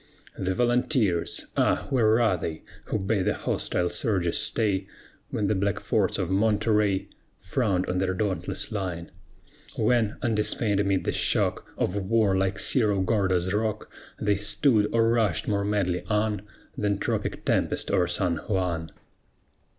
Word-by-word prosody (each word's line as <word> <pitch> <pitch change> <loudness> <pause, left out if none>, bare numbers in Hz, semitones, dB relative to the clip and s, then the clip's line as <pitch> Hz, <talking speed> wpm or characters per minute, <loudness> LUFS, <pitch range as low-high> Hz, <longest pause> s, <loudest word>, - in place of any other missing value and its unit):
The 95 0 -2
Volunteers! 120 - +1
Ah, - - +1
where 115 -3 +4
are 110 -5 +3
they 80 -2 -5 0.2
Who - - -1
bade 100 -1 0
the - - +1
hostile 90 - -1
surges 90 -7 0
stay, 100 -4 0 0.4
When 105 - -1
the 105 - +2
black 100 +1 0
forts 100 -4 0
of 95 -2 -2
Monterey 105 -1 +2 0.3
Frowned 95 -1 0
on 90 0 -1
their 95 0 0
dauntless 105 +2 -2
line? 90 -5 -4 0.6
When, 110 -1 +1
undismayed 105 -2 +1
amid 100 -2 +1
the - - 0
shock - - +1
Of 90 - -1
war, 100 0 +2
like 95 0 0
Cerro 105 -3 +3
Gordo's 95 -2 +1
rock, 110 0 -2 0.3
They 105 -1 +1
stood, 105 +1 +2
or 115 -1 +3
rushed 115 -7 +1
more 100 -1 0
madly 95 -4 0
on 105 -1 0 0.3
Than 105 -1 0
tropic - - -3
tempest - - 0
o'er 90 -1 +2
San 90 -1 0
Juan? 85 -2 -2
100 Hz, 145 wpm, -26 LUFS, 95-110 Hz, 0.6 s, where